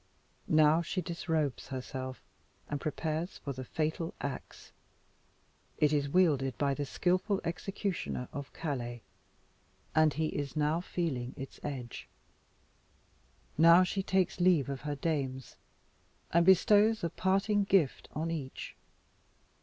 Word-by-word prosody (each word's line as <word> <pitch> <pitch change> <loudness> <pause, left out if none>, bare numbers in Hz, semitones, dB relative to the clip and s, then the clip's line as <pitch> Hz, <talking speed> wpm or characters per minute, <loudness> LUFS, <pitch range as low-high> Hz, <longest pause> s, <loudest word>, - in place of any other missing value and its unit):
Now 155 +1 +5
she 170 +3 -3
disrobes 160 -6 -2
herself, 130 0 -6 0.4
and 145 -1 -3
prepares 160 +3 -2
for 140 - -5
the 130 0 -6
fatal 160 +4 -2
axe. 140 -2 -6 1.1
It 150 0 +3
is 145 -1 +1
wielded 140 -7 +2
by 140 -1 +1
the 145 0 -3
skilful 185 +6 +1
executioner 175 - -3
of 140 -2 -6
Calais, 120 -7 -4 0.9
and 155 -1 +5
he 155 +1 0
is 145 0 -4
now 155 +2 +1
feeling 140 -9 -3
its 135 0 -8
edge. 130 -5 -6 1.5
Now 170 +2 +8
she 195 +2 -1
takes 190 -1 +1
leave 175 -6 +4
of 135 -1 -4
her 150 0 -3
dames, 135 -4 -2 0.8
and 170 +1 +4
bestows 205 +3 +5
a 170 - -1
parting 195 +2 +2
gift 185 -9 +2
on 160 +2 -2
each. 140 -5 -5
155 Hz, 120 wpm, -31 LUFS, 140-175 Hz, 1.5 s, Now